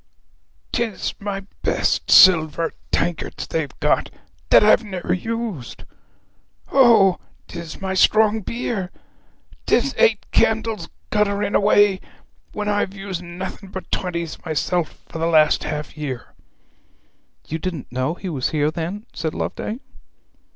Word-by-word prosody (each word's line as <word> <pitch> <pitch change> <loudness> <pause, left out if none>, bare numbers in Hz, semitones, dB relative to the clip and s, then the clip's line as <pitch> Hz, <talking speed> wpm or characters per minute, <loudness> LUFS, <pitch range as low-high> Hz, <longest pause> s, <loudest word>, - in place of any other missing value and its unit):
''Tis 225 -5 -1
my 200 -1 -4 0.2
best - - 0
silver 165 -3 +6 0.2
tankards 175 -2 -2
they've 155 -5 -4
got, - - +1 0.4
that - - +7
I've 215 +2 +5
never 190 -4 -3
used! 220 - -4 0.9
O! 230 -8 +5 0.3
'tis 170 -2 -8
my 190 -1 -3
strong 215 +3 +4
beer! 210 -3 -3 0.8
'Tis - - +2
eight 470 -2 +3
candles 220 -5 +1 0.2
guttering 205 -1 +1
away, 205 -1 +4 0.5
when 210 0 -4
I've 205 -1 0
used 195 -3 -5
nothing 185 +3 -7
but 190 0 -8
twenties 170 -3 -3
myself 160 +1 -2
for 165 - -7
the 165 - +1
last 155 -2 +4
half 150 0 -4
year!' 140 -6 -6 1.1
'You 160 - -3
didn't 170 -5 -5
know 130 +6 -1
he 190 - -7
was 140 -8 -1
here, 150 -1 +1
then?' 175 +7 -5
said 160 -1 -3
Loveday. 220 - -3
185 Hz, 125 wpm, -21 LUFS, 160-210 Hz, 1.1 s, that